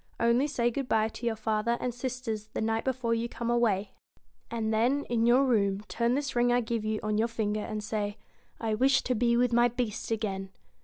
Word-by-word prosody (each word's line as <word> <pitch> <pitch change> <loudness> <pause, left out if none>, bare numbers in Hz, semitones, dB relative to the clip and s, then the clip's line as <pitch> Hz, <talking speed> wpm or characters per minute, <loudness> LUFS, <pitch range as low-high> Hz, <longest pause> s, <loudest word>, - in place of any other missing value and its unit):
Only 235 +4 +3
say 240 -5 0
good 265 +1 -4
bye 220 0 +2
to 235 +2 -5
your 225 - 0
father 220 +2 0
and 250 - -2
sisters 245 -4 -4
the - - -1
night 225 0 0
before 255 -3 0
you 230 +1 -1
come 235 0 -3
away, 215 -5 +1 0.6
and 225 -1 -1
then, 250 +6 +2
in 230 -1 +2
your 255 +3 +5
room, 200 -5 +2
turn 235 +1 +1
this 280 -2 -2
ring 240 0 +3
I 245 - +4
give 230 -2 -2
you 215 0 -1
on 215 0 0
your 225 - +2
finger, 215 -2 -2
and 215 0 -4
say: 210 -1 -2 0.2
" - - -36
I 225 -1 -1
wish 265 +5 +3
to 250 - 0
be 235 0 +2
with 245 0 +2
my 240 +1 +5
Beast 240 -3 -3
again." 200 -4 -2
230 Hz, 220 wpm, -29 LUFS, 215-245 Hz, 0.6 s, your